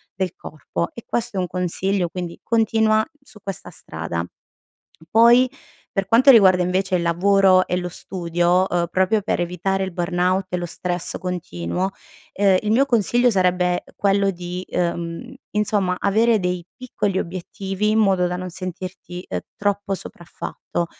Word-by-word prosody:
del 190 Hz, -2 st, -2 dB
corpo 90 Hz, -, -5 dB
e 235 Hz, -, -10 dB
questo 240 Hz, -3 st, -2 dB
è -, -, +1 dB
un 180 Hz, -, -1 dB
consiglio, 180 Hz, +1 st, -1 dB
quindi 175 Hz, -1 st, -6 dB
continua 220 Hz, -1 st, +2 dB, 0.2 s
su 250 Hz, -6 st, -16 dB
questa 195 Hz, -4 st, -6 dB
strada. 85 Hz, +1 st, -5 dB, 0.9 s
Poi 235 Hz, +3 st, +6 dB, 0.5 s
per 195 Hz, -1 st, 0 dB
quanto 250 Hz, +5 st, +6 dB
riguarda 190 Hz, -7 st, +7 dB
invece 185 Hz, +1 st, 0 dB
il 175 Hz, -, -1 dB
lavoro 185 Hz, +2 st, +4 dB
e 180 Hz, -, -1 dB
lo 180 Hz, 0 st, -2 dB
studio, 175 Hz, 0 st, 0 dB
uhm, 175 Hz, -1 st, 0 dB
proprio 190 Hz, +4 st, +2 dB
per 195 Hz, -, -1 dB
evitare 180 Hz, +2 st, -1 dB
il 190 Hz, -, -5 dB
burnout 180 Hz, +2 st, 0 dB
e 180 Hz, -, -2 dB
lo 175 Hz, -, -3 dB
stress 175 Hz, +1 st, -3 dB
continuo, 180 Hz, -, -3 dB, 0.4 s
ehm, 195 Hz, -1 st, +3 dB
il 210 Hz, -, -1 dB
mio 265 Hz, +5 st, +4 dB
consiglio 240 Hz, 0 st, +3 dB
sarebbe 180 Hz, -3 st, +1 dB
quello 200 Hz, 0 st, +2 dB
di, 180 Hz, 0 st, -6 dB
uhm, 170 Hz, -1 st, -3 dB, 0.2 s
insomma, 205 Hz, -3 st, +1 dB
avere 220 Hz, +2 st, +3 dB
dei 180 Hz, -1 st, -2 dB
piccoli 210 Hz, -6 st, -2 dB
obiettivi 190 Hz, +3 st, -3 dB
in 215 Hz, -, +2 dB
modo 190 Hz, -4 st, +3 dB
da 180 Hz, 0 st, -2 dB
non 185 Hz, 0 st, -5 dB
sentirti, 185 Hz, 0 st, -7 dB
ehm, -, -, -2 dB, 0.2 s
troppo 200 Hz, -1 st, -1 dB
sopraffatto. 175 Hz, -1 st, -5 dB
185 Hz, 150 wpm, -22 LUFS, 175-205 Hz, 0.9 s, riguarda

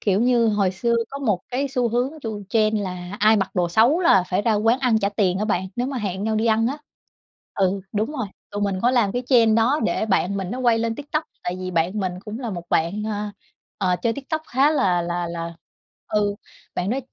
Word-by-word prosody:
kiểu 200 Hz, -1 st, +2 dB
như, 240 Hz, -1 st, +3 dB
hồi 205 Hz, -3 st, +2 dB
xưa 235 Hz, +6 st, 0 dB, 0.2 s
có 275 Hz, -, -5 dB
1 215 Hz, -10 st, 0 dB
cái 270 Hz, +3 st, -1 dB
xu 250 Hz, -2 st, 0 dB
hướng 245 Hz, +4 st, 0 dB
chu 215 Hz, -3 st, -4 dB
trend 215 Hz, -1 st, +2 dB
là 180 Hz, +1 st, -5 dB
ai 215 Hz, +1 st, +6 dB
mặc 195 Hz, -2 st, 0 dB
đồ 175 Hz, -2 st, +1 dB
xấu 235 Hz, -, +4 dB
là 335 Hz, -, +5 dB
phải 185 Hz, +2 st, 0 dB
ra 225 Hz, 0 st, +2 dB
quán 225 Hz, +4 st, +2 dB
ăn 250 Hz, -5 st, +2 dB
trả 200 Hz, -1 st, +1 dB
tiền 195 Hz, -3 st, +1 dB
á 210 Hz, -, 0 dB
bạn, 190 Hz, -3 st, -1 dB
nếu 245 Hz, -, 0 dB
mà 270 Hz, -1 st, -3 dB
hẹn 200 Hz, -2 st, -3 dB
nhau 220 Hz, 0 st, 0 dB
đi 220 Hz, +2 st, +1 dB
ăn 225 Hz, 0 st, +3 dB
á. 280 Hz, +5 st, -2 dB, 0.8 s
Ừ, 195 Hz, 0 st, +1 dB
đúng 215 Hz, +7 st, -1 dB
rồi, 250 Hz, -8 st, -3 dB, 0.2 s
tụi 205 Hz, 0 st, -3 dB
mình 195 Hz, -2 st, 0 dB
có 245 Hz, -, +4 dB
làm 235 Hz, -6 st, +2 dB
cái 245 Hz, -, -2 dB
trend 230 Hz, -4 st, +5 dB
đó 250 Hz, +7 st, +3 dB
để -, -, 0 dB
bạn 200 Hz, -1 st, +1 dB
mình 190 Hz, -2 st, -3 dB
nó 250 Hz, -, -4 dB
quay 235 Hz, -3 st, +3 dB
lên 230 Hz, 0 st, -1 dB
TikTok 295 Hz, +3 st, -3 dB, 0.2 s
tại 175 Hz, +1 st, -2 dB
vì 185 Hz, -, -4 dB
bạn 175 Hz, +4 st, 0 dB
mình 180 Hz, -1 st, -3 dB
cũng 215 Hz, +1 st, -6 dB
là 240 Hz, -3 st, -3 dB
một 175 Hz, -4 st, -5 dB
bạn, 170 Hz, +6 st, +1 dB
ờ, 210 Hz, -1 st, -3 dB, 0.6 s
ờ, 180 Hz, -, +2 dB
chơi 230 Hz, -, +2 dB
TikTok 295 Hz, +5 st, -4 dB
khá 270 Hz, +4 st, +3 dB
là 190 Hz, -, +2 dB
là 175 Hz, 0 st, -2 dB
là 170 Hz, 0 st, -5 dB, 0.5 s
ừ, 205 Hz, -1 st, 0 dB, 0.4 s
bạn 185 Hz, +4 st, -1 dB
đó 255 Hz, -, 0 dB
215 Hz, 240 wpm, -23 LUFS, 190-245 Hz, 0.8 s, ai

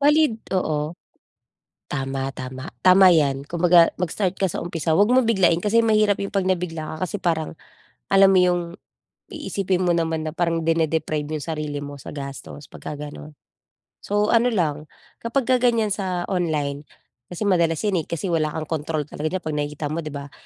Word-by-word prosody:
Valid 300 Hz, -2 st, +4 dB, 0.3 s
oo 150 Hz, -3 st, -1 dB, 1.0 s
tama, 135 Hz, -1 st, -2 dB
tama, 130 Hz, +2 st, -7 dB, 0.2 s
tama 185 Hz, 0 st, +8 dB
yan. 140 Hz, -5 st, +2 dB
Kumbaga 170 Hz, +2 st, +4 dB
mag-start 185 Hz, +1 st, -1 dB
ka 195 Hz, -, +2 dB
sa 175 Hz, -, -4 dB
umpisa, 165 Hz, -2 st, -1 dB
huwag 205 Hz, +6 st, +4 dB
mo 255 Hz, -2 st, +4 dB
biglain 185 Hz, -7 st, +3 dB
kasi 220 Hz, +5 st, +2 dB
mahirap 215 Hz, -3 st, +2 dB
yung 200 Hz, -, -4 dB
pag 195 Hz, -2 st, 0 dB
nabigla 165 Hz, -4 st, -2 dB
ka 185 Hz, -, -1 dB
kasi 205 Hz, -, -5 dB
parang 165 Hz, -3 st, -2 dB, 0.6 s
alam 195 Hz, 0 st, +7 dB
mo 190 Hz, -, +5 dB
yung 180 Hz, -1 st, +2 dB, 0.7 s
iisipin 185 Hz, -2 st, -1 dB
mo 175 Hz, -, +3 dB
naman 160 Hz, -1 st, -1 dB
na 155 Hz, -, -4 dB
parang 165 Hz, -2 st, 0 dB
dine 165 Hz, -1 st, +2 dB
deprive 155 Hz, -2 st, -2 dB
yung 155 Hz, -3 st, -3 dB
sarili 150 Hz, -3 st, -4 dB
mo 145 Hz, 0 st, -7 dB
sa 140 Hz, -, -9 dB
gastos 140 Hz, 0 st, -8 dB
pagka 145 Hz, -, -8 dB
ganon. 150 Hz, -1 st, -11 dB, 0.6 s
So, 205 Hz, +2 st, 0 dB
ano 235 Hz, +1 st, +4 dB
lang 155 Hz, -8 st, -1 dB, 0.3 s
kapagka 250 Hz, +1 st, +1 dB
ganyan 230 Hz, -4 st, +2 dB
sa 185 Hz, -3 st, -2 dB
online 150 Hz, -6 st, -2 dB, 0.4 s
kasi 180 Hz, +4 st, -5 dB
madalas 170 Hz, -3 st, +2 dB
yan, 195 Hz, -4 st, +1 dB
eh, 155 Hz, -, -8 dB
kasi 170 Hz, +2 st, -3 dB
wala 155 Hz, -2 st, +1 dB
kang 155 Hz, +1 st, -4 dB, 0.2 s
kontrol 155 Hz, -1 st, -2 dB
talaga 155 Hz, +4 st, -4 dB
diyan 185 Hz, -, -7 dB
pag 155 Hz, -, -3 dB
nakikita 150 Hz, 0 st, -3 dB
mo, 165 Hz, -, -2 dB
di 155 Hz, -, -6 dB
ba? 145 Hz, 0 st, -8 dB
165 Hz, 180 wpm, -23 LUFS, 150-195 Hz, 1.0 s, tama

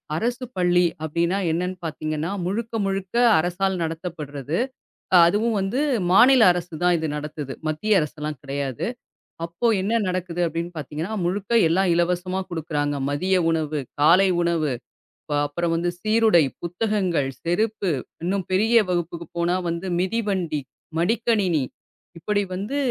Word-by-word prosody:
அரசுப் 245 Hz, +5 st, -2 dB
பள்ளி 180 Hz, 0 st, +3 dB, 0.2 s
அப்டின்னா 170 Hz, +5 st, 0 dB
என்னன்னு 180 Hz, +2 st, -2 dB
பாத்தீங்கன்னா 155 Hz, +1 st, -3 dB, 0.2 s
முழுக்க, 230 Hz, +5 st, -3 dB
முழுக்க 195 Hz, +2 st, -3 dB, 0.2 s
அரசால் 185 Hz, +3 st, 0 dB
நடத்தப்படுறது. 160 Hz, -3 st, -4 dB, 0.7 s
அதுவும் 215 Hz, +5 st, +2 dB
வந்து 195 Hz, +8 st, -1 dB, 0.3 s
மாநில 245 Hz, +5 st, +7 dB
அரசுதான் 175 Hz, 0 st, 0 dB
இது 160 Hz, -, -2 dB
நடத்துது. 150 Hz, -2 st, -5 dB
மத்திய 190 Hz, +6 st, +2 dB
அரசுலாம் 150 Hz, -1 st, -4 dB
கெடையாது. 135 Hz, -3 st, -3 dB, 0.6 s
அப்போ 170 Hz, +8 st, -2 dB, 0.2 s
என்ன 225 Hz, +4 st, +1 dB
நடக்குது 180 Hz, -1 st, -3 dB
அப்டின்னு 165 Hz, +2 st, -3 dB
பாத்தீங்கன்னா 155 Hz, -, -4 dB
முழுக்க 195 Hz, +5 st, -2 dB, 0.2 s
எல்லாம் 185 Hz, +2 st, +2 dB
இலவசமா 180 Hz, +2 st, 0 dB
குடுக்குறாங்க. 150 Hz, -3 st, -2 dB, 0.2 s
மதிய 185 Hz, +6 st, +1 dB, 0.2 s
உணவு, 155 Hz, -2 st, -1 dB, 0.2 s
காலை 185 Hz, +5 st, +6 dB
உணவு 165 Hz, -5 st, +1 dB, 0.6 s
அப் 145 Hz, 0 st, +2 dB
அப்புறம் 165 Hz, +3 st, -2 dB
வந்து 175 Hz, +1 st, 0 dB
சீருடை, 215 Hz, -3 st, +4 dB, 0.2 s
புத்தகங்கள், 180 Hz, -5 st, 0 dB
செருப்பு 200 Hz, +2 st, 0 dB, 0.3 s
இன்னும் 190 Hz, +1 st, -1 dB
பெரிய 220 Hz, +5 st, +2 dB
வகுப்புக்கு 170 Hz, -1 st, -2 dB
போனா 170 Hz, +1 st, +1 dB
வந்து 170 Hz, +3 st, -3 dB
மிதிவண்டி, 190 Hz, -5 st, -1 dB, 0.4 s
மடிக்கணினி 195 Hz, -, +1 dB, 0.6 s
இப்படி 205 Hz, +4 st, 0 dB
வந்து 205 Hz, +9 st, -3 dB
175 Hz, 120 wpm, -23 LUFS, 160-195 Hz, 0.7 s, மாநில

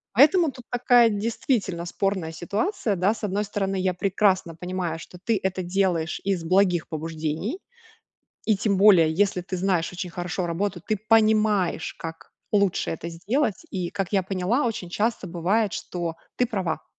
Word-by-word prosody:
Поэтому 310 Hz, -, +6 dB
тут 250 Hz, -2 st, -13 dB
такая, 245 Hz, -1 st, +5 dB
действительно, 205 Hz, -4 st, -1 dB
спорная 190 Hz, -3 st, -1 dB
ситуация, 205 Hz, -, -1 dB
да. 190 Hz, +5 st, +2 dB
С 220 Hz, -, -12 dB
одной 205 Hz, +1 st, 0 dB
стороны, 195 Hz, -1 st, -2 dB
я 185 Hz, 0 st, +1 dB
прекрасно 190 Hz, -2 st, +1 dB
понимаю, 180 Hz, -2 st, -3 dB
что 180 Hz, +2 st, -11 dB
ты 225 Hz, -1 st, +1 dB
это 190 Hz, -1 st, -1 dB
делаешь 180 Hz, -2 st, 0 dB
из 195 Hz, -3 st, 0 dB
благих 180 Hz, -1 st, +2 dB
побуждений. 160 Hz, -, -3 dB, 0.9 s
И 215 Hz, -, +3 dB
тем 200 Hz, 0 st, 0 dB
более, 185 Hz, -5 st, +6 dB
если 190 Hz, +2 st, +1 dB
ты 185 Hz, +1 st, -5 dB
знаешь 180 Hz, -2 st, 0 dB
очень 180 Hz, 0 st, -5 dB
хорошо 175 Hz, +1 st, -3 dB
работу, 175 Hz, +2 st, -2 dB
ты 215 Hz, -, 0 dB
понимаешь, 215 Hz, -6 st, +3 dB
как 165 Hz, 0 st, -8 dB, 0.2 s
лучше 200 Hz, -3 st, +2 dB
это 165 Hz, +1 st, -5 dB
сделать. 210 Hz, -, -1 dB
И, 180 Hz, -3 st, -3 dB
как 195 Hz, -2 st, -3 dB
я 195 Hz, -2 st, +3 dB
поняла, 195 Hz, +8 st, 0 dB
очень 215 Hz, -6 st, -3 dB
часто 210 Hz, +2 st, -1 dB
бывает, 185 Hz, +5 st, 0 dB
что 170 Hz, -2 st, -4 dB, 0.2 s
ты 250 Hz, -, +3 dB
права. 185 Hz, -, -3 dB
190 Hz, 160 wpm, -25 LUFS, 175-210 Hz, 0.9 s, Поэтому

